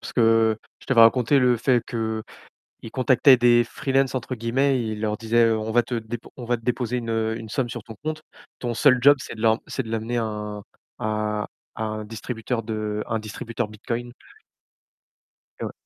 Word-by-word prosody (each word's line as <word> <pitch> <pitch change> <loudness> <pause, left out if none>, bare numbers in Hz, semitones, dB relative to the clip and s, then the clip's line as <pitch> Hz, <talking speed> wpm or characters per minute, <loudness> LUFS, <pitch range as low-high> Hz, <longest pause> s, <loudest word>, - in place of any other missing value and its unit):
parce - - -8
que 115 -2 +4 0.2
je - - -18
t'avais 130 -3 +4
raconté 125 +4 +5
le 125 -2 +4
fait 120 0 +2
qu'ils 110 -2 -4 0.5
contactaient 130 +1 +5
des 120 0 +5
«free-lances», 135 +2 0
entre 130 0 -3
guillemets, 125 +3 +1
ils 110 -1 -4
leur 105 -1 -1
disaient, 115 +1 +2
heu: 110 -1 +2
«On 110 +1 -3
va 120 0 +4
te 125 - -5
dép 115 0 -4 0.2
on 125 - -7
va 120 +1 +1
te 115 - -17
déposer 125 0 -1
une, 115 -1 -4
heu, 110 0 0
une 110 -1 -8
somme 125 +2 -1
sur - - -6
ton 115 -4 -10
compte. 155 0 -3 0.4
Ton 120 -1 -3
seul 130 +1 +5
job, 145 +1 +7
c'est - - -7
de - - -10
l'em 110 +1 +4
c'est 130 - -3
de 110 - -9
l'amener 115 +2 -2
à 115 - 0
un 105 -1 -5 0.4
à 105 -1 -1 0.3
à 110 - -2
un 110 0 -4
distributeur 115 +2 -4
de 105 -1 -3
à 115 - -3
un 110 - +1
distributeur 110 +1 -4
Bitcoin». 120 +3 -5 1.5
Eh - - -2
ouais. - - -4
115 Hz, 205 wpm, -24 LUFS, 110-125 Hz, 1.5 s, job